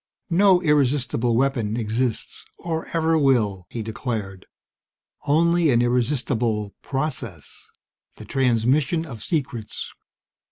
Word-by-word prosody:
"No 185 0 +5
irresistible 130 -5 +2
weapon 120 -4 0
exists, 115 +1 -1
or 165 -1 -4
ever 165 -1 +1
will!" 110 - +2
he 115 - -5
declared. 110 -4 -5 0.8
"Only 170 +2 +3
an 120 -2 +4
irresistible 120 -4 0
process 130 - -5 0.5
the - - -11
transmission 135 +6 +1
of 115 -9 -8
secrets! 130 -7 -3
125 Hz, 95 wpm, -23 LUFS, 115-150 Hz, 0.8 s, No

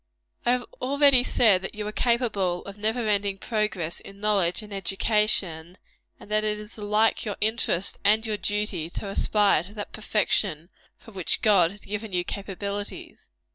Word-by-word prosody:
I 245 - +5
have 250 -1 -2 0.2
already 275 0 +5
said 215 -7 +4
that 190 - -6
you 210 0 -5
are 210 - -3
capable 215 -7 0
of 200 - -8
never 220 +2 0
ending 200 -1 0
progress 210 -6 -2
in 195 0 -13
knowledge 200 -2 +1
and 210 -1 -10
excellence, 195 -3 +1 0.4
and 210 - -14
that 215 0 +2
it 210 0 0
is 210 +1 -7
alike 210 +1 +1
your 205 -2 -4
interest 210 -4 0
and 215 +2 +4
your 215 -2 -1
duty 205 -6 -2
to 200 +3 -6
aspire 205 -3 +2
to 200 +5 -10
that 205 - -6
perfection 185 -6 -1 0.3
for 225 - -16
which 190 -4 -2
God 195 -6 +5
has 205 +2 -10
given 210 0 -5
you 180 -1 +1
capabilities. 200 +1 -6
210 Hz, 170 wpm, -25 LUFS, 195-215 Hz, 0.4 s, I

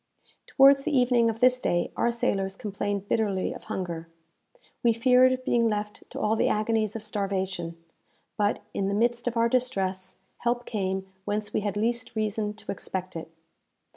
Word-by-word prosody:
Towards 275 0 +6
the 295 -2 +1
evening 245 -2 +4
of 225 0 -4
this 255 0 +5
day 175 -7 0
our 235 - +2
sailors 195 -4 -1
complained 200 -1 -3
bitterly 200 -4 0
of - - -11
hunger. 170 -6 -4 0.7
We 235 -1 +4
feared 255 +2 +4
being 235 -2 +2
left 210 0 -4
to - - -6
all 215 +1 +2
the - - +2
agonies 215 0 +1
of 220 - -5
starvation; 190 -5 -2 0.6
but, 205 0 0
in 195 - -1
the 200 - 0
midst 240 +2 +1
of 240 -1 -1
our 230 0 +4
distress, 195 -7 -1 0.2
help 240 0 0
came 190 -3 -2 0.2
whence 210 0 -2
we - - +2
had 205 0 -2
least 235 +2 -1
reason 215 -1 -1
to 215 - -6
expect 185 -1 -5
it. 165 0 -6
215 Hz, 170 wpm, -27 LUFS, 195-235 Hz, 0.7 s, Towards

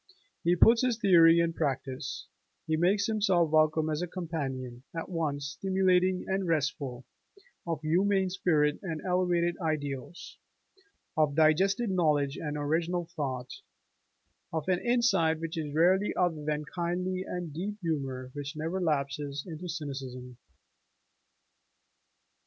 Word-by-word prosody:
He 175 +1 +3
puts 230 +6 +6
his 250 -3 +1
theory 170 -6 +6
in 170 0 +1
practice: 135 -4 -3 0.4
he 160 - 0
makes 190 +5 +2
himself 195 -7 +2
welcome 155 0 +3
as 155 +1 -1
a 180 - -2
companion 135 -9 -5 0.2
at 165 - -4
once 145 -5 -2
stimulating 185 0 +1
and 190 -1 -1
restful, 140 -5 -1 0.6
of 165 -3 -2
humane 190 +4 +2
spirit 150 -5 +1
and 165 -5 -4
elevated 175 -2 +1
ideals, 150 -1 -4 0.8
of 150 -2 +2
digested 190 +8 +3
knowledge 150 -6 +2
and 150 -1 -4
original 165 +4 -1
thought, 130 -4 -4 0.9
of 160 -1 -3
an 180 -1 +2
insight 235 -10 +2
which 165 0 -5
is 155 -3 -3
rarely 180 +6 +3
other 170 -4 0
than 150 0 -1
kindly 180 +3 -2
and 180 -3 -5
a - - -12
deep 200 +6 -4
humor 135 -6 -3
which 145 +1 -6
never 165 +5 -3
lapses 145 -2 -1
into 175 0 -7
cynicism. 130 -6 -6
165 Hz, 130 wpm, -29 LUFS, 150-180 Hz, 0.9 s, puts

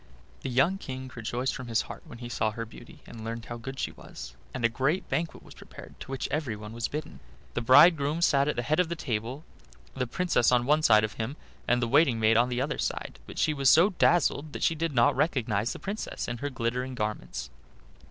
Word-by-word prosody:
The - - -4
young 140 +10 +2
King 130 -3 -7
rejoiced 120 +3 -2
from 125 -2 -7
his 115 0 +1
heart - - -9
when 120 - -10
he 120 0 -7
saw 110 -2 0
her 115 +2 -5
beauty 145 +7 -14
and 115 -2 -10
learned 115 0 -5
how 120 - -6
good 135 +3 -7
she - - -2
was, - - -10 0.2
and 125 -3 -2
a - - +7
great 135 +9 -1
banquet 165 0 -2
was - - -14
prepared, - - -12
to - - -9
which 135 -1 -3
everyone 110 -8 -3
was 120 0 -2
bidden. 150 +1 -6 0.3
The - - -1
bridegroom 150 +5 +6
sat 140 -3 +4
at 150 - 0
the 120 - -2
head 155 +7 +1
of 180 -2 +2
the 170 - -2
table, 125 +1 -4 0.5
the 125 -1 -2
Princess 150 -4 +2
on 120 -1 +3
one 150 +3 +3
side 110 -7 +6
of 110 - -2
him 115 +7 -4 0.3
and 125 0 +2
the - - +1
waiting 135 -2 +4
maid 110 0 +4
on 120 +2 +4
the 125 0 -1
other; 150 +3 -2 0.5
but - - -10
she 155 - +2
was 135 -2 +3
so 175 +6 +6
dazzled 155 -4 +2
that - - -4
she - - +3
did 165 -1 -2
not 120 -2 +4
recognize 115 -8 0
the - - -5
Princess 205 +2 -5
in 120 0 -4
her 145 - -2
glittering 125 +1 -2
garments. 105 -2 -4
130 Hz, 225 wpm, -28 LUFS, 115-150 Hz, 0.5 s, a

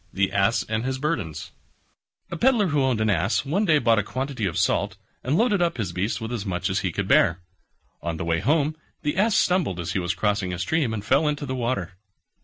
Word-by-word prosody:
THE 95 0 0
ASS 100 +3 +2
AND 110 +1 -2
HIS 130 +1 -2
BURDENS 110 - -3 0.8
A - - -3
Pedlar 230 -1 +3
who 145 -2 +1
owned 130 -4 +1
an 110 - +2
Ass 95 - +1
one 185 +10 +1
day 160 -5 +4
bought 115 -4 +3
a - - 0
quantity 130 -1 -3
of 90 +1 -3
salt, 90 - +1 0.3
and 140 +6 +1
loaded 210 -4 +2
up 170 -4 +1
his 100 -7 -2
beast 95 +7 -2
with 110 0 -5
as 115 -5 -3
much 95 -2 -2
as 95 - +1
he 95 - -2
could - - -3
bear. 85 +1 +4 0.6
On 85 -1 -3
the 85 - -4
way 85 0 +1
home 150 - +1 0.3
the 150 +1 -1
Ass 210 +3 +2
stumbled 175 - +1
as 85 - -3
he - - 0
was 90 0 -2
crossing 105 -3 0
a - - -3
stream 140 - 0
and 105 -2 -4
fell 155 - +3
into 145 -1 -1
the 130 - -4
water. 115 -8 -3
115 Hz, 230 wpm, -24 LUFS, 95-150 Hz, 0.8 s, day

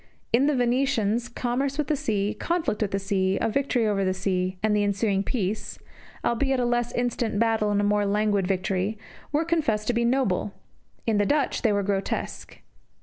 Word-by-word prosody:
In 260 +4 +4
the 300 - +2
Venetians, 245 -2 +1
commerce 255 +3 -2
with 300 - +1
the 305 - +1
sea, 210 -6 -1
conflict 335 -11 -1
with 210 - +1
the 195 - -1
sea, 195 -1 0
a - - +1
victory 250 0 +1
over 200 -2 +1
the 185 0 0
sea, 185 -1 -1
and 215 -1 +3
the 205 - +2
ensuing 200 0 +1
peace 205 -1 -3 0.5
albeit 265 +2 +1
a 245 - +1
less 240 0 0
instant 240 -3 -1
battle 225 -1 +2
and 205 0 +1
a - - 0
more 205 0 +2
languid 205 -2 +1
victory 190 +2 -1 0.3
were 300 +3 +1
confessed 285 -11 0
to - - +3
be 235 0 +1
noble; 235 -6 0 0.5
in 220 -2 +2
the 205 - +3
Dutch 290 -2 +1
they 225 - +3
were 200 -1 +1
grotesque. 195 0 -3
215 Hz, 190 wpm, -26 LUFS, 200-245 Hz, 0.5 s, In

